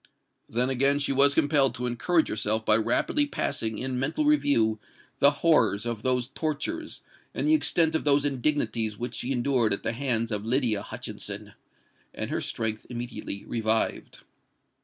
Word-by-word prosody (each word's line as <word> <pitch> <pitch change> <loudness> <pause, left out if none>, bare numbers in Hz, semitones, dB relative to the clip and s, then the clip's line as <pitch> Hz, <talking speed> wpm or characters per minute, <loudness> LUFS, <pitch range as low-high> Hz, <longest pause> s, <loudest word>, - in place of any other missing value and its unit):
Then 125 +3 0
again 140 +2 +2
was 140 +1 +4
she - - +3
compelled 145 -4 +2
to 125 0 -4
encourage 125 +8 +1
herself 110 +1 -1
by 110 - +4
rapidly 120 - +1
passing 110 - -2
in 130 +1 -3
mental 155 - -1
review 115 - +3 0.4
the 140 - +7 0.2
horrors 115 -10 +3
of 115 -3 -3
those 125 0 0
tortures 240 - -4 0.3
and - - -1
the 310 - +4
extent 170 - +3
of 160 - 0
those 145 -1 +3
indignities 125 -6 0
which 120 0 -4
she 125 - -2
endured 125 -4 +1
at 100 - -4
the 115 - 0
hands 115 -3 0
of 105 -1 -1
Lydia 115 -3 +1
Hutchinson!—and - - -7
her - - -1
strength 110 -1 -2
immediately 120 -4 -6
revived. 110 -1 -2
125 Hz, 155 wpm, -26 LUFS, 115-145 Hz, 0.4 s, the